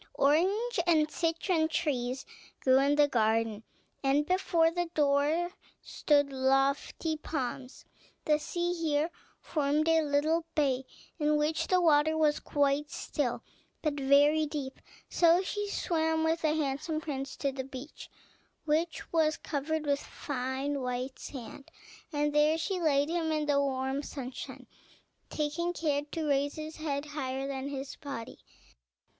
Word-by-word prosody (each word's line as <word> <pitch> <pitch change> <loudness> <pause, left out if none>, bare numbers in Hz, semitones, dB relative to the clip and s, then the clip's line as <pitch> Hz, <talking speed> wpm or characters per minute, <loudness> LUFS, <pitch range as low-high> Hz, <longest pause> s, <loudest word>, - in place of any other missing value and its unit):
Orange 380 - +2
and 310 -3 +3
citron 330 0 +1
trees 270 -6 -1 0.4
grew 260 0 +5
in 280 +1 +3
the 295 0 +5
garden, 225 -3 +1 0.4
and 275 +2 +3
before 340 -2 +2
the 350 0 -1
door 300 +4 +2 0.3
stood 285 -2 +2
lofty 270 +4 +1
palms. 265 -3 -5 0.4
The 300 -1 +3
sea 345 +3 -2
here 320 -1 0 0.3
formed 300 +1 0
a 325 0 +5
little 305 +3 +1
bay, 265 -4 +1 0.3
in 300 0 +2
which 305 +1 0
the 370 - +3
water 315 -2 +4
was 305 -2 +3
quite 285 0 +1
still, 265 -5 -2 0.4
but 305 -2 +1
very 290 +2 +4
deep; 285 -3 -5 0.3
so 345 +2 +4
she 415 +2 -3
swam 320 -4 0
with 325 +1 +1
the 310 -1 +2
handsome 310 +1 -1
prince 275 -4 -5
to 275 - -1
the 265 0 -4
beach, 265 +2 -9 0.6
which 320 +3 -1
was 315 -2 +3
covered 310 +2 -2
with 285 -1 +1
fine, 270 +1 -3
white 250 +1 -3
sand, 265 +1 -9 0.4
and 295 -1 0
there 300 +2 +4
she 360 +3 -2
laid 290 -3 +3
him 330 -1 -1
in 305 -1 0
the 285 -1 +3
warm 265 0 -1
sunshine, 265 -3 -7 0.6
taking 310 +4 -1
care 295 -4 0
to 315 +1 -4
raise 285 0 +1
his 310 0 -7
head 290 -2 -2
higher 270 -2 -3
than 270 0 -4
his 275 -1 -6
body. 275 -5 -7
295 Hz, 140 wpm, -30 LUFS, 275-320 Hz, 0.6 s, grew